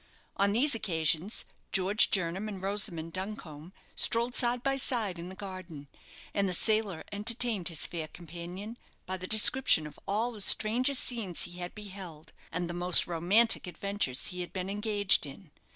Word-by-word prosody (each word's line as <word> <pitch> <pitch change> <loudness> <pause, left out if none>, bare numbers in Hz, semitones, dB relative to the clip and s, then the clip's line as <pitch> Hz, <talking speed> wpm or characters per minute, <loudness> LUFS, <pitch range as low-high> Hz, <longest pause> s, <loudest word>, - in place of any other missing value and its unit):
On 200 0 +2
these 255 +7 +3
occasions 170 -2 0 0.3
George 195 +2 +3
Jernam 190 +2 -1
and 200 -2 -7
Rosamond 190 -4 0
Duncombe 185 -5 -7 0.2
strolled 235 +2 +1
side 245 0 +1
by 275 0 0
side 225 -9 0
in 175 +2 -7
the 190 - -10
garden; 185 -7 -9 0.5
and 200 -1 0
the 180 - +2
sailor 215 -5 0
entertained 215 -2 +1
his 165 -4 -1
fair 165 -2 -5
companion 175 +7 -9 0.3
by 190 +1 -4
the 185 0 -8
description 220 -5 +6
of 150 - -11
all 220 +5 -1
the 215 -3 -8
strangest 245 +7 +3
scenes 215 -8 -2
he 175 +1 -6
had 175 0 -6
beheld, 190 -7 -10 0.2
and 175 -1 -3
the 175 - -6
most 175 0 +4
romantic 185 +6 +3
adventures 190 -8 -3
he 180 0 -5
had 175 - -6
been 185 0 -4
engaged 205 -5 +2
in. 150 +4 -13
195 Hz, 165 wpm, -29 LUFS, 175-215 Hz, 0.5 s, description